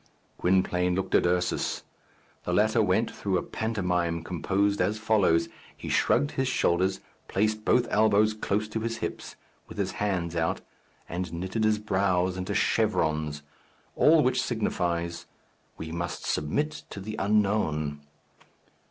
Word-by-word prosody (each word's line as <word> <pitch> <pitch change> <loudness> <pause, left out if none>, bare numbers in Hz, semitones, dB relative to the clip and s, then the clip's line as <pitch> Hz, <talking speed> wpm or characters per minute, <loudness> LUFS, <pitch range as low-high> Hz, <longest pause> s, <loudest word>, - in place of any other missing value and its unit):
Gwynplaine 90 -1 +2
looked 95 - -3
at - - +4
Ursus. 90 0 0 0.6
The - - -2
latter - - +3
went - - +1
through 95 -2 -1
a 85 - -2
pantomime 90 -6 -1
composed 100 +4 0
as 100 +4 +1
follows: 105 -6 +2 0.3
he - - -7
shrugged 145 - +2
his 130 0 -1
shoulders, 95 -5 +1 0.3
placed 110 +2 0
both 125 +2 +3
elbows 110 0 +4
close 105 0 -1
to 110 - -3
his 115 +1 -3
hips, - - -5 0.3
with - - -11
his - - -1
hands 90 -5 -2
out, 80 0 0 0.5
and 90 0 -4
knitted 95 +6 -3
his 110 0 +3
brows 95 -3 +1
into 95 +2 -3
chevrons 80 -9 +1 0.5
all 155 0 +5
which 130 0 +2
signifies, 85 -7 -2 0.5
"We 80 0 -6
must 85 0 -4
submit 150 - -1
to - - -7
the 105 +2 -6
unknown." 95 -8 +1
95 Hz, 135 wpm, -27 LUFS, 85-110 Hz, 0.6 s, all